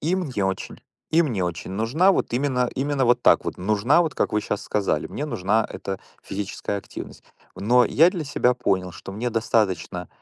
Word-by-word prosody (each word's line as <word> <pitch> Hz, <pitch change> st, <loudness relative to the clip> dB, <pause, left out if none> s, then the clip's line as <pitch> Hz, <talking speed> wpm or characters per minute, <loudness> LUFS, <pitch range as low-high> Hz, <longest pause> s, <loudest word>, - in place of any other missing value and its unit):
И 165 Hz, +5 st, +1 dB
мне 130 Hz, -, -2 dB
очень 95 Hz, -1 st, -3 dB, 0.3 s
и 165 Hz, +2 st, +5 dB
мне 115 Hz, -, -1 dB
очень 85 Hz, 0 st, -4 dB
нужна 115 Hz, -, +3 dB
вот -, -, -1 dB
именно 125 Hz, -1 st, +1 dB
именно 140 Hz, 0 st, 0 dB
вот 120 Hz, 0 st, +3 dB
так -, -, +5 dB
вот -, -, -4 dB
нужна, 105 Hz, -, +3 dB
вот 160 Hz, -3 st, -3 dB
как -, -, 0 dB
вы 105 Hz, -, +2 dB
щас 105 Hz, 0 st, -3 dB
сказали, 100 Hz, -7 st, -1 dB
мне 145 Hz, -, -5 dB
нужна 110 Hz, -5 st, +1 dB
эта 95 Hz, -1 st, -5 dB, 0.2 s
физическая 100 Hz, 0 st, -4 dB
активность. -, -, -9 dB, 0.3 s
Но 120 Hz, +5 st, +4 dB
я 165 Hz, +8 st, +5 dB
для 170 Hz, -5 st, -4 dB
себя 125 Hz, -3 st, +2 dB
понял, 95 Hz, -6 st, 0 dB
что 95 Hz, -, -9 dB
мне 120 Hz, +5 st, -2 dB
достаточно, 95 Hz, -6 st, 0 dB
115 Hz, 190 wpm, -24 LUFS, 95-140 Hz, 0.3 s, и